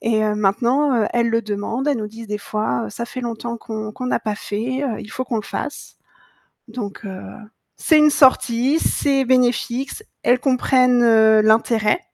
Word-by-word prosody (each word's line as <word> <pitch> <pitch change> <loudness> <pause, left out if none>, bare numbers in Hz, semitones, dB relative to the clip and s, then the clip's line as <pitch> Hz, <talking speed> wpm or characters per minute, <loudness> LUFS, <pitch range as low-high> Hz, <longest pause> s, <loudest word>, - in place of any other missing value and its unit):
Et 220 -1 0
heu, 210 0 0
maintenant, 240 +8 +1
heu, - - +1
elles 235 -1 +1
le 230 0 0
demandent, 215 +7 -3
elles 285 - +1
nous 215 -2 -4
disent 225 0 -11
des 210 0 -3
fois, 165 - -2
«Ca 235 - -5
fait 255 +1 -7
longtemps 235 0 -5
qu'on 215 -2 -6
qu'on 255 +1 -6
n'a - - 0
pas 215 -2 -3
fait, 240 +8 -4
heu, 235 -5 -3
il 215 - -11
faut 255 - -4
qu'on 240 - -3
le 215 - -2
fasse». 290 +8 -7 0.7
Donc 220 -2 -7
heu, 190 -1 -7 0.6
c'est 315 -2 +3
une 300 0 +5
sortie, 260 +1 +3
c'est 275 -4 +1
bénéfique, 250 +1 +1
c 440 - -10 0.2
elles 245 +1 +3
comprennent 255 -2 +2 0.4
l'intérêt 220 +4 +2
235 Hz, 185 wpm, -20 LUFS, 215-255 Hz, 0.7 s, une